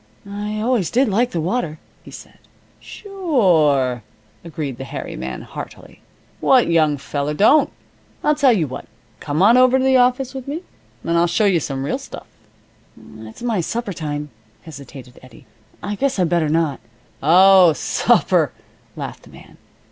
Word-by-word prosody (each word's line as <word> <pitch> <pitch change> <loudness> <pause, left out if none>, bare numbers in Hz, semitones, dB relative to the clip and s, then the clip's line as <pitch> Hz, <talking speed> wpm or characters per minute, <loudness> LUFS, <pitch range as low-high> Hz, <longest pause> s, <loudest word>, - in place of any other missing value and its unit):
"I 210 +1 -5
always 225 -6 0
did 255 +3 +2
like 235 +5 +1
the 170 - -3
water," 170 -2 -2 0.2
he - - -14
said. - - -13 0.4
"Sure," 175 - 0 0.4
agreed 150 -6 -6
the - - -5
hairy 135 - -7
man, 65 0 -6
heartily. - - -10 0.4
"What 255 -2 +4
young 155 -3 +2
feller 145 +2 -4
don't? 220 - +4 0.5
I'll 300 - +3
tell 285 -3 +3
you 190 -9 +1
what. 130 - -8 0.3
Come 150 +4 -1
on 230 +5 +6
over 255 +1 +5
to 260 - 0
the 265 -1 +4
office 255 +1 +1
with 265 -1 -8
me 310 +6 -5 0.4
and 170 - -1
I'll 170 +1 +3
show 190 +5 +1
you 190 -4 +3
some 135 -3 -4
real - - -2
stuff." - - -10 0.9
"It's 110 - -11
my 225 -6 0
supper 225 +3 -4
time," 150 -3 -5 0.3
hesitated 135 -4 -12
Eddie. 130 +1 -17 0.4
"I 205 +3 -3
guess 270 +4 -1
I'd 180 -3 +1
better 170 -3 +1
not 155 -3 0 0.2
" - - -35
"Oh, 180 +2 +6
supper," - - +1 0.4
laughed - - -7
the - - -18
man. - - -16
175 Hz, 165 wpm, -19 LUFS, 150-245 Hz, 0.9 s, on